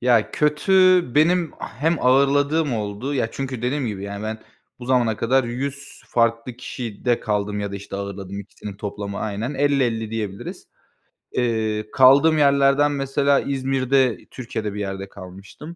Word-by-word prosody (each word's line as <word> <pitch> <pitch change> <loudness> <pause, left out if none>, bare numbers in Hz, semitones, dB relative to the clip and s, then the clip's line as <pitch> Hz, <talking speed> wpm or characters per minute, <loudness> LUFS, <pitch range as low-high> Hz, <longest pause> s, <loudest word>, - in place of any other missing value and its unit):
Ya, 120 -3 +3
kötü 150 +5 0 0.4
benim 165 +2 +3
ah - - -7
hem 165 +1 +3
ağırladığım 140 +2 +3
oldu. 110 +6 -3
Ya, 115 -4 0
çünkü 130 -3 -5
dediğim 130 +1 -1
gibi 100 -3 -4
yani 100 +1 -6
ben 110 0 -4 0.4
bu 120 - -9
zamana 120 -4 +2
kadar 130 +2 +2
100 140 +4 -6
farklı 115 +1 0
kişide 120 -1 -3
kaldım 105 -1 -1
ya 100 -1 -4
da, - - -3
işte, 100 0 -7
ağırladım 100 0 -6
ikisinin 100 0 -9
toplamı 100 -1 -5
aynen. 110 +5 -3
50-50 130 -6 +1
diyebiliriz. 105 -3 -5 0.7
Eee, 110 -3 -1
kaldığım 140 +5 +6
yerlerden 140 0 +4
mesela 140 0 +1
İzmir'de, 135 -2 +1
Türkiye'de 110 -5 -5
bir 105 - -5
yerde 95 -1 -4
kalmıştım. 100 - -11
120 Hz, 145 wpm, -22 LUFS, 105-140 Hz, 0.7 s, kaldığım